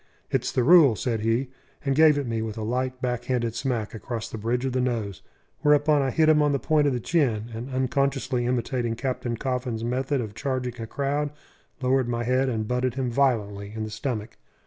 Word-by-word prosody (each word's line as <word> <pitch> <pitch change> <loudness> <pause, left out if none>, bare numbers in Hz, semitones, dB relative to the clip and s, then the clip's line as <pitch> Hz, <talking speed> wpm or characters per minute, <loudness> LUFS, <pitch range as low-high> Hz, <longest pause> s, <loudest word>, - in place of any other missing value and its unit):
"It's - - 0
the 125 - +1
rule," 150 -4 +7
said 115 +2 -1
he, 115 +4 0 0.3
and 135 -1 +1
gave 155 -1 +6
it 140 - -1
me 115 -2 -2
with 110 -1 -4
a 110 - -3
light, 125 +3 -2
back 125 -1 -1
handed 120 -3 0
smack 115 -4 -2
across 115 0 -5
the 115 - -7
bridge 120 +4 -1
of 130 - -1
the 130 - +1
nose; 115 -7 -2 0.4
whereupon 150 0 +4
I 135 - +1
hit 160 +4 +3
him 155 -1 +5
on 145 -1 +3
the - - +2
point 150 +1 +2
of 140 - +1
the 125 - -1
chin, 120 -7 0
and, 115 +4 -6
unconsciously 130 -1 0
imitating 120 -1 -1
Captain 125 -1 -3
Coffin's 125 -3 -2
method 130 +4 0
of 110 -4 -4
charging 125 -1 -3
a 115 - -5
crowd, 145 +4 -1 0.5
lowered 130 -1 +2
my 120 0 -1
head 130 +2 +2
and 110 -3 -2
butted 125 0 0
him 130 -2 -1
violently 105 -6 0
in 110 - -3
the 110 - -5
stomach. 110 -1 -4
125 Hz, 210 wpm, -25 LUFS, 115-135 Hz, 0.5 s, rule